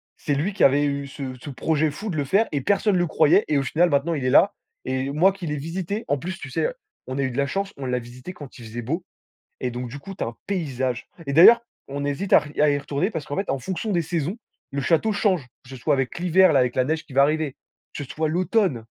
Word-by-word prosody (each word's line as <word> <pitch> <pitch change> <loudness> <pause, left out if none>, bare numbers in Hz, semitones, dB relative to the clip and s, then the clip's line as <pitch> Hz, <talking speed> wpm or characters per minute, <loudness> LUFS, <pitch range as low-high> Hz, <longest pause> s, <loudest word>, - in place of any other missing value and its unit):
c'est 145 - -2
lui 175 +9 -1
qui - - 0
avait 145 +2 +5
eu 140 0 -2
ce 135 -1 -6
ce 145 - -7
projet 155 +3 0
fou 205 +9 -6
de 170 - -3
le 145 - +1
faire 200 +11 +2
et 140 - 0
personne 200 +5 +2
le 175 0 +2
croyait 155 +6 +4
et 150 - +3
au 140 - +2
final, 170 +6 +2
maintenant, 145 +3 +1
il 145 -5 -2
est - - +2
là - - +5 0.3
et 130 +1 -1
moi 180 +7 +4
qui 190 -3 -7
l'ai 150 0 -2
visité, 180 +8 -4
en 145 - +1
plus, 175 +6 -5
tu 135 - -7
sais, 480 - 0 0.4
on 130 - -4
a 140 - 0
eu 130 - -1
de 125 - -7
la 140 - +2
chance, 195 +6 -3
on 135 - -6
l'a 125 -1 0
visité 125 +7 -10
quand 145 -6 -11
il 120 - -11
faisait 115 +2 -6
beau 165 +10 -3 0.6
et 125 - -1
donc, 125 +1 -5
du 135 +4 -8
coup, 195 +8 -9
tu - - -6
as - - 0
un 115 - -10
paysage 130 -10 -2 0.2
et 140 - -2
d'ailleurs, 175 +11 +8 0.3
on 140 +1 -4
hésite 145 +8 -3
à - - +10
r - - -10 0.2
à 150 0 +5
y 145 - +1
retourner 145 +7 -1
parce 160 -8 -4
qu'en 145 - -5
fait, 195 - -1
en 135 - 0
fonction 190 - -4
des 170 -3 +1
saisons, 170 - -2 0.3
le 140 0 -2
château 165 - +2
change, 190 - +1 0.2
que 125 - -15
ce 135 - -8
soit 145 +4 +1
avec 135 -2 -2
l'hiver, 180 0 +5
là, 135 - +4
avec 125 -1 0
la 130 - +3
neige 155 +3 -1
qui 135 - -15
va 140 - +6
arriver, 150 -1 0 0.4
que 145 - -4
ce 130 - -15
soit 155 0 0
l'automne. 180 - +1
145 Hz, 280 wpm, -24 LUFS, 135-180 Hz, 0.6 s, à